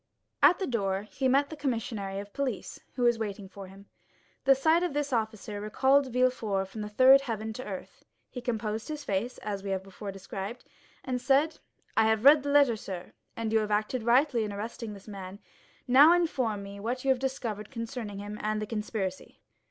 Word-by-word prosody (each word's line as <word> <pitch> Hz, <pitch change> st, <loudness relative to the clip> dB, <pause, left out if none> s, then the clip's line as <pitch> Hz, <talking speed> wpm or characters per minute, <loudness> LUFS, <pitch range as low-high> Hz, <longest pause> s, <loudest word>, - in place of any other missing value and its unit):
At 360 Hz, -, +7 dB
the 385 Hz, -, -2 dB
door 200 Hz, -, -1 dB
he 260 Hz, +5 st, -2 dB
met 275 Hz, +3 st, +3 dB
the -, -, -5 dB
commissary 225 Hz, -8 st, -3 dB
of 200 Hz, +1 st, -7 dB
police, 270 Hz, -7 st, -3 dB, 0.2 s
who 250 Hz, -, -1 dB
was 240 Hz, -1 st, +3 dB
waiting 205 Hz, -2 st, -4 dB
for 195 Hz, 0 st, -10 dB
him. 195 Hz, +1 st, -14 dB, 0.6 s
The 270 Hz, 0 st, +7 dB
sight 315 Hz, +6 st, +3 dB
of 355 Hz, -4 st, -1 dB
this 290 Hz, -2 st, -1 dB
officer 220 Hz, -2 st, -2 dB
recalled 265 Hz, +6 st, +3 dB
Villefort 225 Hz, -6 st, +1 dB
from 215 Hz, +2 st, -7 dB
the 210 Hz, -, -4 dB
third 260 Hz, +5 st, +7 dB
heaven 220 Hz, -4 st, -4 dB
to 255 Hz, -, -6 dB
earth; 210 Hz, -, -8 dB, 0.3 s
he 250 Hz, -, -6 dB
composed 220 Hz, -2 st, -3 dB
his 300 Hz, -1 st, -5 dB
face, 215 Hz, +2 st, -2 dB
as 205 Hz, -2 st, -3 dB
we 200 Hz, -, -5 dB
have 190 Hz, -1 st, -1 dB
before 195 Hz, +1 st, -7 dB
described, 195 Hz, +4 st, -7 dB, 0.4 s
and 250 Hz, -1 st, -2 dB
said, 280 Hz, +5 st, +2 dB, 0.4 s
"I 220 Hz, -, +4 dB
have 220 Hz, +2 st, +1 dB
read 295 Hz, +1 st, +8 dB
the 285 Hz, -, -4 dB
letter, 280 Hz, -5 st, +5 dB
sir, 185 Hz, -4 st, -7 dB, 0.2 s
and 225 Hz, -1 st, -3 dB
you 220 Hz, -, +5 dB
have 215 Hz, -1 st, -2 dB
acted 215 Hz, +4 st, 0 dB
rightly 240 Hz, +1 st, +3 dB
in 210 Hz, -, -3 dB
arresting 215 Hz, +2 st, -5 dB
this 195 Hz, -, -14 dB
man; 195 Hz, -2 st, -8 dB, 0.5 s
now 280 Hz, +6 st, +8 dB
inform 255 Hz, -12 st, 0 dB
me 200 Hz, 0 st, -9 dB
what 245 Hz, +5 st, -3 dB
you 270 Hz, -, +4 dB
have 260 Hz, -, +1 dB
discovered 235 Hz, -6 st, -3 dB
concerning 230 Hz, -4 st, -5 dB
him 205 Hz, +1 st, -6 dB
and 215 Hz, 0 st, -1 dB
the 215 Hz, -, -2 dB
conspiracy." 210 Hz, -3 st, -4 dB
225 Hz, 200 wpm, -29 LUFS, 205-260 Hz, 0.6 s, read